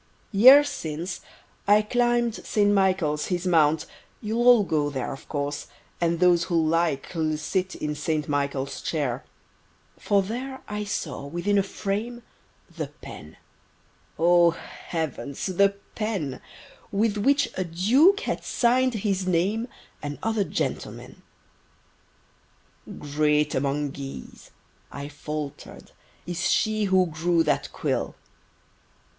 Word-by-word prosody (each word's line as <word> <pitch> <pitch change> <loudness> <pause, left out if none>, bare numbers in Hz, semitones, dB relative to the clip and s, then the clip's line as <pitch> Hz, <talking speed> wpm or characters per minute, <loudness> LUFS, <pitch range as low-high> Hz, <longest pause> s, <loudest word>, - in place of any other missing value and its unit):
Years 260 +8 +8
since, 170 - -5 0.5
I 210 +1 +5
climb'd 240 +1 +1
Saint 205 -1 +1
Michael 185 -6 +2
His 175 +4 -2
Mount:—you'll 180 +8 0
all 240 -4 +7
go 150 -5 0
there 135 -3 -3
Of 135 - -12
course, 145 0 -3 0.3
and 170 -1 +1
those 175 -1 +4
who 175 - -2
like'll 160 -1 0
Sit 185 +5 -2
in 150 0 -3
Saint 150 0 -2
Michael's 140 -2 -2
Chair: 140 -5 -2 0.8
For 200 -2 +2
there 255 +6 -5
I 210 0 -4
saw, 155 -8 -4
within 175 +6 +1
a - - +4
frame, 215 +5 -4 0.5
The - - -3 0.2
pen—O 170 +1 -1 0.4
heavens! 155 -4 -3
the 200 +1 +2 0.2
pen— 195 - -3 0.5
With 210 +1 +1
which 280 +6 +2
a 185 - -1
Duke 245 - +4
had - - -3
sign'd 250 +1 +2
his 195 -3 -1
name, 195 +7 +1 0.3
And 145 -1 -5
other 220 -2 +1
gentlemen. - - -4 1.8
"Great 150 0 +1
among 140 +1 -1
geese," 135 - -9 0.4
I 140 0 -6
faltered, 150 -1 -7 0.3
"Is 175 +1 -1
she 215 -1 +1
who 190 -1 +4
grew 165 +1 +1
that 150 - 0
quill!" - - -2
175 Hz, 115 wpm, -25 LUFS, 150-210 Hz, 1.8 s, Years